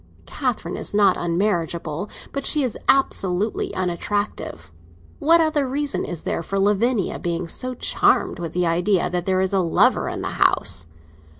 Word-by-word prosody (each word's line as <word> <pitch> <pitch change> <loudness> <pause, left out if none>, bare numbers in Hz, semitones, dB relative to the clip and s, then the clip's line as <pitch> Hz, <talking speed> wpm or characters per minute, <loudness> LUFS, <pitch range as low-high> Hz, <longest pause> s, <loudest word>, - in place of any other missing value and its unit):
Catherine - - -3
is - - -4
not 205 -1 +5
unmarriageable, 170 -1 -1 0.2
but 280 - -3
she 300 0 +3
is 250 - -2
absolutely 205 -6 +1
unattractive. 180 - -3 0.5
What 330 +2 +5
other 305 -4 +1
reason 285 +2 -1
is 170 -2 -5
there - - -2
for 195 +4 -4
Lavinia 205 +2 +1
being 170 0 -3
so 255 +8 -2
charmed - - +1
with 170 -2 -5
the 180 0 +1
idea 175 +2 +1
that 180 0 -2
there 185 0 +2
is 190 +1 -1
a 195 - +3
lover 170 -3 +2
in - - -5
the - - -2
house? 90 -2 +2
190 Hz, 160 wpm, -22 LUFS, 170-225 Hz, 0.5 s, not